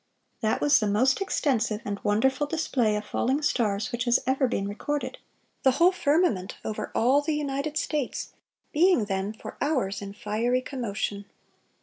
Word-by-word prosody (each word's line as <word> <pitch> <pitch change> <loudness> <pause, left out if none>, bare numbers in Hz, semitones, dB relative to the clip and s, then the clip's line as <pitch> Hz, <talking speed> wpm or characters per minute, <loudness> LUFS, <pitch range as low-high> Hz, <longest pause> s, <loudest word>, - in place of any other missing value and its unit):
That 220 0 0
was 290 0 +5
the 215 - 0
most 255 - +2
extensive 245 - 0
and 200 -1 -3
wonderful 265 +8 +1
display 265 -9 0
of 210 0 -3
falling 270 +8 0
stars 215 -7 0
which 240 +1 -2
has 240 0 +4
ever 265 +1 +2
been 200 -5 -2
recorded; 290 - -3 0.4
"the 265 - +4
whole 340 +7 +5
firmament, 305 - +1
over 215 - -4
all 260 +5 +4
the 305 +1 -1
United 290 +1 -2
States, 295 -4 -2 0.4
being 330 - +4
then, 195 0 -2
for 220 - -10
hours, 255 -10 0
in 200 0 -7
fiery 225 +5 0
commotion! 205 -6 -3
250 Hz, 155 wpm, -27 LUFS, 210-290 Hz, 0.4 s, was